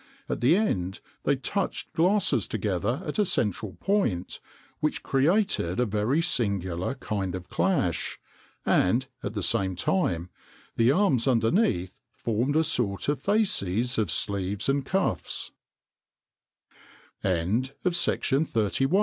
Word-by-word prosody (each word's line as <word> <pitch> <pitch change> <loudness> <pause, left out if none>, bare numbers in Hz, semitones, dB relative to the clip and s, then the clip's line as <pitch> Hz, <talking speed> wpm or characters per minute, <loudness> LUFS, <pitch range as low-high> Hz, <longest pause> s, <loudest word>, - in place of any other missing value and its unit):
At - - -3
the 130 +8 +5
end 95 - 0 0.3
they 140 - +3
touched 180 +10 -2
glasses 190 +5 +2
together - - -1
at - - -3
a - - +5
central 105 - 0
point, 195 - -1 0.4
which 150 - -1
created 145 - +1
a 125 - +3
very 110 +9 +1
singular 95 - -1
kind 100 -8 -3
of 90 -1 -8
clash, 90 - 0 0.5
and, 115 +9 +3 0.2
at - - -5
the 100 - -2
same 95 0 +1
time, 90 - 0 0.4
the 115 +2 +4
arms 145 - +2
underneath 115 - +1 0.2
formed 120 +6 -1
a 160 - +4
sort 120 -9 0
of 145 -2 -1
fasces 125 - +1
of 105 -5 0
sleeves 100 +3 0
an 140 +1 +2
120 Hz, 110 wpm, -27 LUFS, 95-160 Hz, 0.5 s, the